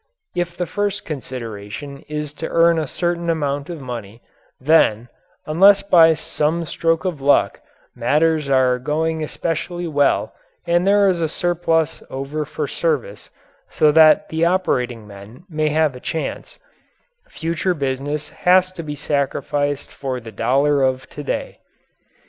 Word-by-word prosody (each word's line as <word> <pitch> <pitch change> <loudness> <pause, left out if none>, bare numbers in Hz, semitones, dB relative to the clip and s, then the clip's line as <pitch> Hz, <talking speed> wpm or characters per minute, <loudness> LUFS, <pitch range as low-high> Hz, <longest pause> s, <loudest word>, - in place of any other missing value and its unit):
If 175 -1 -2
the 180 - -1
first 205 +2 -2
consideration 130 -1 -7
is 150 -1 -4
to 160 - -2
earn 170 0 +4
a 155 - -2
certain 170 +2 -2
amount 145 -3 -1
of 170 -3 -6
money, 120 -4 -8 0.4
then, 125 -6 +3 0.4
unless 195 +6 +5
by 165 -4 +6
some 155 +2 -1
stroke 165 +2 0
of 170 -7 -3
luck 140 +1 +2 0.3
matters 150 +4 +1
are 130 -2 +3
going 160 +4 -1
especially 170 +3 -3
well 145 -4 +1 0.3
and 175 +2 +2
there 200 0 +5
is 180 -3 +1
a 160 - 0
surplus 165 -2 0
over 140 +3 -4
for 150 0 -4
service 135 -11 -2 0.4
so 150 - +3
that 160 +6 +6
the 160 +1 -1
operating 125 - 0
men 105 - -13
may 155 -3 -1
have 155 -2 +1
a - - -9
chance, 160 +5 -5 0.7
future 170 +2 -2
business 145 +1 -3
has 185 +1 +3
to 185 -2 -7
be 150 -2 -6
sacrificed 145 0 -2
for 130 -2 -4
the 115 -2 -10
dollar 135 +7 +2
of 130 0 0
to 145 - -7
day. - - -4
150 Hz, 145 wpm, -20 LUFS, 135-170 Hz, 0.7 s, by